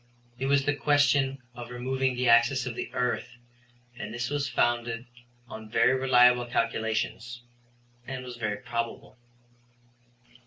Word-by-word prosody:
It 135 - -1
was 140 0 +3
the 145 - +2
question 140 -2 +2
of 120 0 -9
removing 130 +1 -1
the 125 0 0
axis 120 +2 +4
of 125 - -4
the - - -5
earth, 125 0 -2 0.6
and 110 -4 -7
this 120 +3 -3
was 145 -2 -1
founded 120 0 0 0.4
on 110 -1 -9
very 125 +3 +3
reliable 125 -2 +4
calculations, 115 +1 -2 0.6
and 130 -1 -5
was 125 -1 -8
very 110 -3 -2
probable. 115 +1 -5
125 Hz, 130 wpm, -27 LUFS, 120-130 Hz, 0.6 s, axis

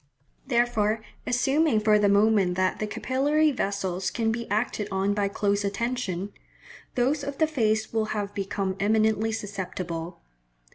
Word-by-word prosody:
Therefore, 230 -4 +1 0.2
assuming 270 +1 +2
for 210 0 +4
the 205 -1 +3
moment 200 -3 +3
that 185 0 0
the 215 - -1
capillary 290 +7 +1
vessels 195 -6 -2
can 225 -1 0
be 235 +1 -4
acted 210 -1 -1
on 195 +1 0
by 205 -1 +1
close 200 0 0
attention, 200 -2 -2 0.6
those 275 +4 +1
of 280 0 -5
the 315 - +4
face 220 -8 0
will 220 -1 +1
have 205 -2 -3
become 195 -1 -2
eminently 220 +1 +2
susceptible. 185 -5 -5
215 Hz, 140 wpm, -26 LUFS, 200-240 Hz, 0.6 s, for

